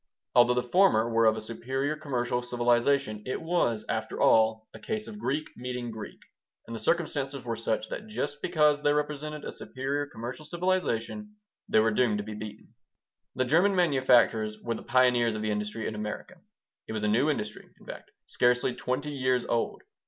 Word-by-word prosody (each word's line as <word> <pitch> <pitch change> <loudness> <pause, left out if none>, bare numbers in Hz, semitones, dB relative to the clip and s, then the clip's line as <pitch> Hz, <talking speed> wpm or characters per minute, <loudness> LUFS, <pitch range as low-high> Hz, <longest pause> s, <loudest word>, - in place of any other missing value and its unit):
Although 120 0 +5
the 125 - +1
former 125 - +4
were 115 0 +4
of 110 0 +3
a - - -4
superior 130 +6 -2
commercial 125 -5 -2
civilization, 120 -1 +1
it 130 - -2
was, 160 -10 0
after - - -3
all, 110 0 +4
a - - -10
case 215 0 -4
of 210 -2 -8
Greek 150 -4 -2
meeting 125 -1 -4
Greek, 110 -1 -8 0.5
and 115 - -7
the - - -5
circumstances 140 -1 -1
were 115 -1 -2
such 110 -1 -2
that 215 - -6
just 145 -9 -4
because 150 -4 +3
they 145 0 +3
represented 150 0 -3
a - - -4
superior 140 +2 -3
commercial 125 +2 -7
civilization 185 - -2 0.3
they - - +3
were 110 +1 +3
doomed 110 -1 +2
to 105 - -3
be 110 +1 -7
beaten 105 0 -9 0.6
The 130 - +1
German 175 +9 +3
manufacturers 125 -9 +3
were 115 +2 -3
the - - -6
pioneers 120 -2 +3
of 110 - -4
the 110 - 0
industry 105 +1 -3
in - - -3
America. 105 +11 -6 0.5
It - - -5
was 110 -1 -3
a - - +2
new 120 +8 +3
industry, 105 -7 -4
in - - -18
fact, - - -9 0.2
scarcely 125 0 +2
twenty 130 +4 -3
years 130 -3 0
old. 115 - -1
125 Hz, 180 wpm, -28 LUFS, 110-145 Hz, 0.6 s, Although